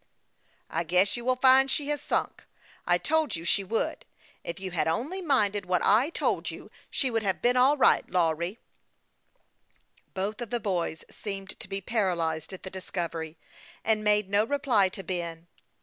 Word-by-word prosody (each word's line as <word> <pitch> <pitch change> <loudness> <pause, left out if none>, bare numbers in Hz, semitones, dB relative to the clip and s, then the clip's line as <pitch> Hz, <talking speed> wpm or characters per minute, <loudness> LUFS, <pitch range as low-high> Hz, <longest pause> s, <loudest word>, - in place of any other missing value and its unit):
" - - -42 0.3
I - - 0
guess 180 +4 +2
you 240 - -5
will 255 +1 +2
find 265 +1 +6
she 285 +2 -1
has 295 -1 -1
sunk. - - -2 0.4
I - - +4
told 315 0 0
you 165 +1 -6
she 200 +3 +3
would. 220 +4 -2 0.4
If 170 - -5
you 190 -1 -5
had 170 - 0
only 275 - -2
minded 210 - +1
what 180 -1 +1
I 245 +7 +4
told - - -1
you, - - -10 0.2
she 260 - 0
would 225 -1 +1
have 190 -3 -1
been 245 +1 +2
all 265 +4 +5
right, - - +4
Lawry." 170 +2 0 1.6
Both 200 +4 -3
of 240 - -5
the 240 - -1
boys 175 -6 -2
seemed 195 -2 -6
to - - -5
be 195 0 -4
paralyzed 175 -7 -1
at 190 - -8
the 190 - -7
discovery, 170 -4 -4 0.5
and 215 -1 +2
made 210 -1 +3
no 200 +2 +3
reply 245 -6 +2
to 190 +1 -8
Ben. 170 -2 -4
200 Hz, 180 wpm, -28 LUFS, 180-245 Hz, 1.6 s, find